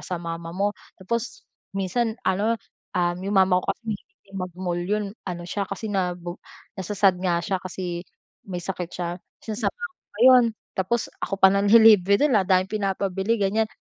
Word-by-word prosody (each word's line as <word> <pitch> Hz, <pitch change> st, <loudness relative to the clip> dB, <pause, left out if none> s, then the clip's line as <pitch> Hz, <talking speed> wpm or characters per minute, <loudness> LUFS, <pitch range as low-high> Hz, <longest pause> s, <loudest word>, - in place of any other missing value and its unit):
sa 180 Hz, -, -3 dB
mama 165 Hz, 0 st, -5 dB
mo, 200 Hz, +3 st, 0 dB, 0.3 s
tapos 235 Hz, +5 st, -3 dB, 0.3 s
minsan 220 Hz, +4 st, 0 dB
ano, 200 Hz, +4 st, +2 dB, 0.4 s
um, 175 Hz, -1 st, +1 dB
'yong 195 Hz, +1 st, -2 dB
mama 185 Hz, -1 st, +5 dB
ko -, -, +1 dB
kasi -, -, -41 dB
mahilig 220 Hz, -, -6 dB
din 195 Hz, 0 st, -11 dB
mag-mall 180 Hz, -1 st, -3 dB
'yon 210 Hz, +4 st, 0 dB, 0.2 s
ano 175 Hz, -1 st, -4 dB
siya 200 Hz, +2 st, -1 dB
kasi 220 Hz, -, -5 dB
nabo 180 Hz, -2 st, -2 dB, 0.4 s
nasa-sad 190 Hz, 0 st, +2 dB
nga 175 Hz, -2 st, +1 dB
siya 190 Hz, +2 st, -1 dB
kasi 175 Hz, -1 st, -4 dB, 0.4 s
may 180 Hz, -3 st, -4 dB
sakit 180 Hz, -2 st, -4 dB
siya, 175 Hz, -1 st, -3 dB, 0.4 s
sinasama 220 Hz, +1 st, -2 dB
ko 475 Hz, -5 st, -7 dB, 0.2 s
pa 205 Hz, -, -14 dB
'yon, 255 Hz, -1 st, +8 dB, 0.3 s
tapos 215 Hz, +5 st, 0 dB, 0.2 s
ako -, -, -3 dB
pa 190 Hz, -, +9 dB
nanlilibre 200 Hz, -1 st, +6 dB
dun, 285 Hz, -6 st, +4 dB
daming 185 Hz, 0 st, +2 dB
pinapabili 195 Hz, +1 st, -1 dB
ganiyan. 215 Hz, +3 st, +1 dB
195 Hz, 165 wpm, -24 LUFS, 180-215 Hz, 0.4 s, pa